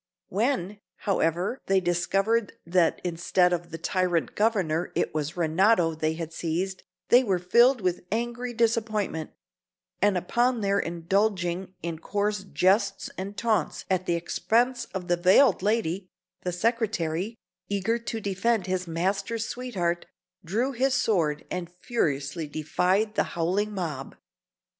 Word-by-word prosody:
When, 210 -2 -1 0.3
however, 185 - 0
they 195 0 +4
discovered 195 +5 +1
that 170 -1 +2
instead 180 +1 +2
of 175 0 -3
the 165 - -6
tyrant 175 0 0
Governor 185 -7 +1
it - - 0
was 155 +2 -3
Renato 170 +1 +3
they 155 0 -1
had 165 0 -6
seized, 180 +4 -2 0.3
they 245 +2 +7
were 195 -6 +1
filled 235 +8 +4
with 180 -2 -1
angry 240 +2 -2
disappointment; 220 -8 0 0.7
and 200 -1 +4
upon 240 +6 +1
their 200 0 +2
indulging 180 +1 -1
in 165 -2 -4
coarse 205 +2 -1
jests 195 +1 +1
and 195 +2 -6
taunts 215 -8 0
at 185 0 +1
the 170 - +2
expense 240 +8 +1
of 185 -2 -6
the 175 -1 +2
veiled 185 +6 +5
lady, 195 -3 0 0.3
the 180 - -2
secretary, 210 -2 -1 0.3
eager 205 +4 0
to 230 -1 -4
defend 200 +1 0
his 185 -1 -2
master's 195 +7 -1
sweetheart, 185 -9 -2 0.4
drew 225 +10 0
his 265 +1 +1
sword 165 -11 +1
and 180 -2 -3
furiously 155 - -2
defied 180 +8 0
the - - +2
howling 190 +6 +1
mob. 155 -8 -4
190 Hz, 135 wpm, -27 LUFS, 170-220 Hz, 0.7 s, they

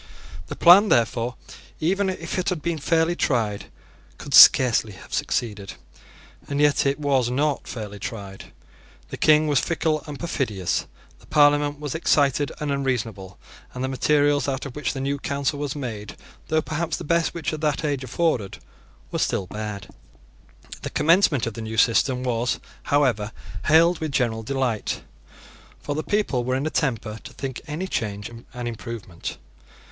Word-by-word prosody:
The - - -6
plan, 190 +5 +7
therefore, 120 +1 +1 0.4
even 190 +5 +1
if 175 -1 -4
it 180 - 0
had 175 -5 -3
been 170 -2 -1
fairly 165 +3 +1
tried, 110 -10 0 0.5
could - - -8
scarcely 115 -4 +7
have 95 - -13
succeeded; 105 -5 -2 0.7
and 140 0 -2
it 145 -1 +2
was 135 -4 +1
not 145 +3 0
fairly 105 -3 -7
tried. 100 -3 -7 0.6
The - - -6
King 155 0 +5
was 145 -2 +3
fickle 160 -2 -1
and 145 -2 -7
perfidious: 110 - -2 0.3
the - - -20
Parliament 145 -1 +3
was 145 -3 -4
excited 145 -3 +2
and 150 -1 -2
unreasonable; 115 -9 -3 0.4
and 125 - -3
the - - 0
materials 145 +2 +2
out 135 0 -2
of 140 - -8
which 150 - -2
the 135 - -5
new 140 +1 -1
Council 140 0 -2
was 145 -2 -3
made, 110 -7 -6 0.3
though 155 0 +1
perhaps 165 +2 -2
the - - -7
best 170 +2 +1
which 165 -3 -2
that 155 -1 -1
age 140 -3 -1
afforded, 130 - -1 0.5
were - - -2
still 95 - 0
bad. 105 0 -6 0.9
The - - -4
commencement 155 - +3
of 115 - -4
the 115 - -7
new 110 0 -5
system 125 +3 +3
was, 120 -1 -1 0.3
however, 125 -7 +1 0.3
hailed 165 +3 +5
with 155 -2 -3
general 120 -5 0
delight; 125 -2 -2 0.8
for 145 - -4
the 155 - -2
people 180 -11 0
were 130 +1 -1
in 135 +3 -1
a 155 - -1
temper 115 -6 -2
to - - -10
think 135 -2 -5
any 155 +5 -3
change 105 - -3 0.2
an 120 -1 -6
improvement. 115 -6 -6
140 Hz, 160 wpm, -24 LUFS, 115-150 Hz, 0.9 s, plan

